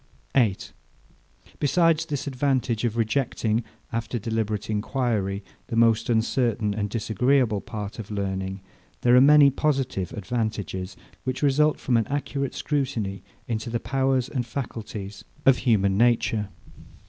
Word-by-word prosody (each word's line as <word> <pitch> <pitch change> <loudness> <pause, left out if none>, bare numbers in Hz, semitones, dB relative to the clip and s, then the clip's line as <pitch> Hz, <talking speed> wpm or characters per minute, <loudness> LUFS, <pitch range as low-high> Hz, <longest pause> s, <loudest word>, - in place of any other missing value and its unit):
8. 115 -8 +1 0.9
Besides 165 +2 +3
this 145 -4 -3
advantage 130 -4 0
of 115 -1 -1
rejecting, 115 -1 0 0.3
after 115 +1 -2
deliberate 110 -2 -2
enquiry, 105 -3 -1 0.2
the 115 - -4
most 115 0 +3
uncertain 115 -2 +1
and 105 0 -2
disagreeable 115 +1 +1
part 105 0 -6
of 105 - -7
learning, 95 -1 -3 0.4
there 120 0 +5
are 125 - +8
many 145 0 +7
positive 135 - -1
advantages, 105 -3 -3 0.3
which 130 +2 -3
result 150 +2 +3
from 125 -3 +1
an 115 - 0
accurate 140 -1 -2
scrutiny 120 -10 -2 0.3
into 115 -1 -3
the 115 0 -1
powers 130 +1 +1
and 125 -4 -3
faculties 110 -5 -6 0.2
of 135 -2 +6
human 100 -5 +2
nature. 115 -3 +2
115 Hz, 125 wpm, -25 LUFS, 105-135 Hz, 0.9 s, are